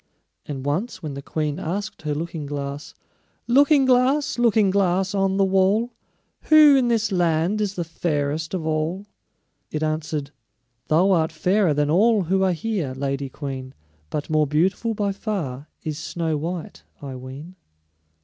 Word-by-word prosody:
And 135 -2 -5
once 180 +7 -2
when 150 -3 -4
the 140 - -6
queen 150 +1 -3
asked 200 +5 -4
her 150 -2 -2
Looking 160 -1 -4
glass: 140 0 -5 0.5
"Looking 280 +3 +5
glass, 260 +3 +2
Looking 220 -4 +4
glass, 190 0 +1
on 195 -1 +1
the 195 - +4
wall, 195 +5 +2 0.5
Who 305 -2 +7
in 260 -3 +3
this 225 -2 +1
land 175 +3 +1
is 205 -1 -1
the 175 - -2
fairest 160 0 -2
of 165 -4 -3
all?" 160 +5 -1 0.6
it 155 0 -3
answered: 155 -2 -2 0.6
"Thou 175 +6 +3
art 160 -3 +2
fairer 180 +1 +2
than 150 0 +1
all 210 +4 +4
who 190 +3 +1
are 190 -1 +3
here, 170 -6 -3
Lady 135 0 -3
Queen, 130 -1 -6 0.3
But 150 - -3
more 155 -1 +2
beautiful 190 +10 +1
by 205 -1 0
far 160 - -4
is 155 -1 -4
Snow 165 -1 -2
white, 165 +3 -5 0.2
I 135 -2 -7
ween." 135 +8 -9
170 Hz, 155 wpm, -23 LUFS, 150-200 Hz, 0.6 s, Who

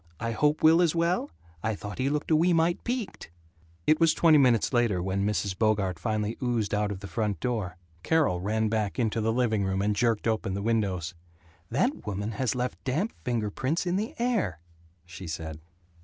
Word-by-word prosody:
I 115 +1 -2
hope 150 +7 +1
Will 160 +2 +7
is 170 -2 +2
well? 170 -2 +1 0.3
I 110 +3 -1
thought 100 -1 -8
he 130 +2 +1
looked 150 +2 -2
a - - +6
wee 170 +3 +3
mite 165 +1 +1
peaked." 240 - -4 0.6
It 155 - +4
was 165 -1 +4
twenty 160 -3 +5
minutes 125 -3 +3
later 120 -6 +2
when 95 +2 -1
Mrs. 105 -2 -1
Bogart 100 -5 +1
finally 110 +3 -2
oozed 120 -5 0
out 105 0 +1
of 95 -2 -6
the 100 - -6
front 105 -1 -2
door. 105 -8 -2 0.2
Carol 145 - +2
ran 110 +3 0
back 105 -2 -1
into 115 -2 0
the 110 +1 +1
living 110 -4 +1
room 95 0 -1
and 105 0 +1
jerked 115 0 +1
open 110 -4 -1
the 100 - -3
windows. 100 -7 0 0.6
"That 240 - 0
woman 105 +2 -3
has 115 +2 -1
left 125 0 -3
damp 155 - -1
finger 115 -4 -1
prints 145 - -1
in 175 0 0
the 210 +3 -2
air," 235 - 0 0.5
she 90 +1 -9
said. 80 -1 -5
110 Hz, 195 wpm, -27 LUFS, 100-150 Hz, 0.6 s, Will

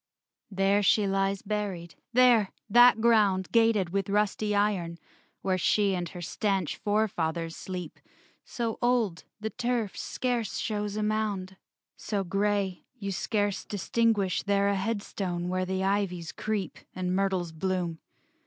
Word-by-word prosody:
VII 200 - -12
There 195 +2 +3
she 205 +1 +4
lies 195 0 0
buried; 195 -5 -3 0.2
there! 240 -5 +5 0.2
that 240 +2 +7
ground 210 -5 +3
Gated 225 -6 +3
with 195 0 -1
rusty 210 +1 +1
iron, 195 -5 0 0.5
where 185 -1 +1
She 200 +2 +2
and 175 -2 -2
her 175 +1 -8
stanch 195 -1 -1
forefathers 170 -6 -1
sleep; 180 -4 -6 0.4
So 230 -2 -3
old, 240 -8 +1
the 220 +1 -3
turf 235 -4 -1
scarce 245 -4 -2
shows 210 -1 -2
a 215 - -1
mound; 210 -3 -1 0.4
So 200 -2 -2
gray, 195 0 0
you 200 -4 -4
scarce 205 +1 -1
distinguish 205 -2 +1
there 200 0 +2
A 200 - +1
headstone 190 -4 -2
where 185 0 0
the 190 +1 -2
ivies 190 -4 -1
creep 210 -6 -3 0.2
And 185 0 -1
myrtles 190 -3 0
bloom. 175 0 -2
200 Hz, 135 wpm, -28 LUFS, 185-215 Hz, 0.5 s, that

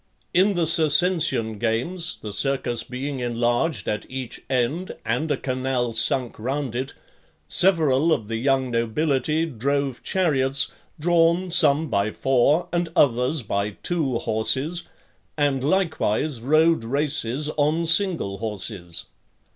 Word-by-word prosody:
In 190 +3 +3
the 170 -1 +1
Circensisn 160 - +3
games; 160 - -1
the 105 -2 -5
circus 130 +2 0
being 135 +2 -5
enlarged 120 +1 -1
at 105 0 -2
each 130 -2 -7
end, 135 +8 -1
and 125 +8 -1
a 145 - 0
canal 130 -2 -2
sunk 120 +2 -1
round 135 +2 -3
it, 130 +2 -4 0.5
several 165 -5 +4
of 110 -9 0
the 115 0 -3
young 135 +1 0
nobility 140 +6 0
drove 140 -1 -2
chariots, 140 -6 0 0.3
drawn, 170 +2 +2
some 160 -2 +4
by 100 -4 0
four, 135 +8 +1
and 175 -1 0
others 125 +2 +2
by 100 0 -3
two 150 -9 -1
horses, 130 +11 -2 0.5
and 140 -3 0
likewise 155 - 0
rode 155 +2 +3
races 140 +1 -1
on 155 +3 +1
single 165 - +2
horses. 100 -5 -5
135 Hz, 125 wpm, -23 LUFS, 120-160 Hz, 0.5 s, several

